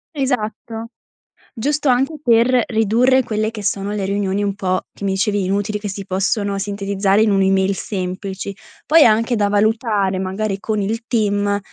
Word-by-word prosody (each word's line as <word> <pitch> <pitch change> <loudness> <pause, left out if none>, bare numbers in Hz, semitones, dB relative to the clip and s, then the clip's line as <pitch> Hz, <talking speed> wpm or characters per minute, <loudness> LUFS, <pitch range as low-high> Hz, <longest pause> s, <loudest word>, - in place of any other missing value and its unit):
Esatto. 230 -4 -3 0.6
Giusto 290 +4 0
anche 260 +5 +2
per 240 +1 +4
ridurre 240 +4 +3
quelle 215 -1 -1
che 215 -2 -7
sono 200 0 -2
le 205 -2 -2
riunioni 200 0 -1
un 200 -1 -1
po', 185 -2 -1
che - - -11
mi 195 - 0
dicevi, 200 +1 0
inutili, 205 +3 -1
che 205 0 -5
si 195 0 -6
possono 195 +1 -1
sintetizzare 200 0 0
in 220 - +3
un'email 195 0 +2
semplici. 190 0 -5 0.3
Poi 320 0 +6
anche 230 +2 +3
da 205 -1 +1
valutare, 210 -2 +1
magari, 195 +2 -2
con 215 -1 -1
il 225 +4 -2
team 205 -3 +1
205 Hz, 160 wpm, -19 LUFS, 195-225 Hz, 0.6 s, Poi